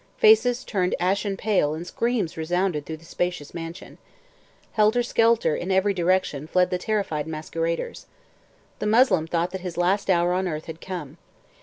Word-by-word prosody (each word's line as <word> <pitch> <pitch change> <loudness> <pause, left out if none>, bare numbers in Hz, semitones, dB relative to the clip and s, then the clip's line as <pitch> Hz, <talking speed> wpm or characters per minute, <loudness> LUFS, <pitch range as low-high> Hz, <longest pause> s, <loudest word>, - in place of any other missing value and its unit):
Faces 255 - +5
turned 185 -4 0
ashen 195 +2 0
pale 185 -9 +1
and 165 +2 -6
screams 230 -2 -1
resounded 170 -1 -1
through 160 - -5
the 165 - -18
spacious 175 -4 -3
mansion. 165 +2 -8 0.7
Helter 220 +3 +3
skelter, 230 -8 +2
in 180 - -4
every 190 +1 +2
direction, 175 -5 0
fled 180 +2 +2
the 180 - 0
terrified 180 -8 -1
masqueraders. 165 +1 -3 0.7
The 210 - -2
Moslem 210 -8 +4
thought 170 +1 -1
that 190 - -5
his 180 -2 -6
last 190 +3 +1
hour 175 -1 +3
on 185 +1 0
earth 155 -2 -4
had 160 0 -9
come. 170 -5 -6
180 Hz, 160 wpm, -24 LUFS, 165-200 Hz, 0.7 s, Faces